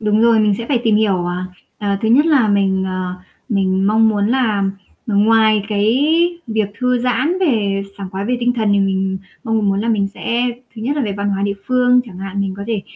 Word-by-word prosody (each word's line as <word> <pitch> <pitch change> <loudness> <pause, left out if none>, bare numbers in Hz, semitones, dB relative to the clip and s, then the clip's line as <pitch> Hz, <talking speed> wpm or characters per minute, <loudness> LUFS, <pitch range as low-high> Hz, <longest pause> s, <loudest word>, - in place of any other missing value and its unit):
Đúng 210 0 +1
rồi, 230 -1 +4
mình 210 -1 +2
sẽ 230 - -5
phải 255 -5 +1
tìm 220 -2 +3
hiểu, 210 -2 +2
ờ, 175 0 -2 0.4
ờ, 200 -1 -1
thứ 220 - +1
nhất 275 +7 +4
là 280 -9 +3
mình, 195 -2 +1
ờ, 185 -1 -3 0.3
mình 195 -3 +1
mong 220 +1 +4
muốn 205 -2 +1
là, 225 -5 +1 0.4
ừm, 205 -1 +2
ngoài 220 -1 +4
cái 210 +1 +1 0.5
việc 220 -3 -1
thư 250 -1 +1
giãn 255 +9 0
về 210 - +1 0.2
sảng 195 -2 -6
khoái 190 +1 -4
về 250 +3 0
tinh 245 0 +2
thần 220 -4 0
thì 200 - +3
mình 190 -1 0 0.3
mong 220 -3 0
muốn 195 0 +1
là 230 - -2
mình 205 -3 +1
sẽ 235 +1 -1 0.3
thứ 220 - -8
nhất 280 +6 -1
là 290 - 0
về 210 -4 -2
văn 200 +1 -3
hóa 195 0 -1
địa 200 0 0
phương 250 0 +3
chẳng 195 -7 -11
hạn, 195 +1 -4
mình 195 -1 -2
có 200 - -6
thể, 220 -4 -2
215 Hz, 230 wpm, -17 LUFS, 195-235 Hz, 0.5 s, rồi